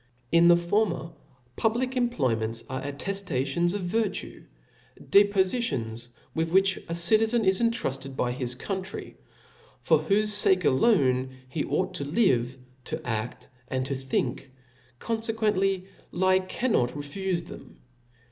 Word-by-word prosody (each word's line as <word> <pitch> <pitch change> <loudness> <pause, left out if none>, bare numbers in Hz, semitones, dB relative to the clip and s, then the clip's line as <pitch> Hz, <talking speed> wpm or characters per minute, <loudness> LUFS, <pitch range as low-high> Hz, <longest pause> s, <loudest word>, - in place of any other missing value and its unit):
In 170 0 +6
the 175 0 +7
former, 175 -1 0 0.4
public 245 +4 0
employments 120 - 0
are 130 0 -4
atteftations 170 +1 -1
of 205 - -2
virtue, 195 +3 -2 0.5
depofitums 190 - +1 0.3
with 165 0 -1
which 195 +1 +3
a 165 - -2
citizen 220 +6 +3
is 190 +3 +3
entrufted 135 - -1
by 125 -1 0
his 125 -1 -3
country, 190 +7 -5 0.6
for - - +3
whofe 210 +1 +2
fake 185 -3 +3
alone, 130 - +3 0.2
he 150 +3 -2
ought 185 0 -1
to 165 - -3
live, 135 - +1 0.3
to 155 - -3
a<9:, 120 -6 -4 0.2
and 130 0 -2
to 140 - -2
think; 130 0 -2 0.5
confequently 215 -4 0 0.3
he 185 +1 +3
can* 255 +5 -1
not 120 - +2
refufethem 170 +4 -5
*. - - -29
175 Hz, 125 wpm, -27 LUFS, 135-205 Hz, 0.6 s, the